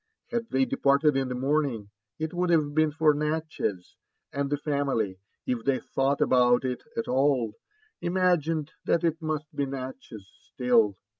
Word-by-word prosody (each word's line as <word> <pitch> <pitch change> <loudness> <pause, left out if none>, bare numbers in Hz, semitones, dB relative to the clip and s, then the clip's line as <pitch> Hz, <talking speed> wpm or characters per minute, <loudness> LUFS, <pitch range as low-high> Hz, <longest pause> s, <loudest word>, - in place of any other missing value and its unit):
Had 235 -1 -2
they 135 0 +2
departed 140 +2 +3
in 135 -1 0
the 125 - -3
morning, 130 -6 -1 0.3
it 160 +1 -3
would 180 0 0
have 155 -4 +2
been 155 0 +3
for 155 0 +3
Natchez; 150 - -3 0.4
and 140 0 -1
the 145 - 0
family, 140 -10 -1 0.3
if 120 -3 -2
they 135 0 +2
thought 135 +2 -1
about 125 0 +4
it 125 -1 -2 0.2
at 115 - -2
all, 130 -4 +2 0.5
imagined 170 -4 +1
that 170 - +2
it 165 -1 +1
miit 155 -2 -2
be 140 - -1
Natchez 130 -6 -7 0.2
still. 115 -6 +3
140 Hz, 155 wpm, -27 LUFS, 125-155 Hz, 0.5 s, about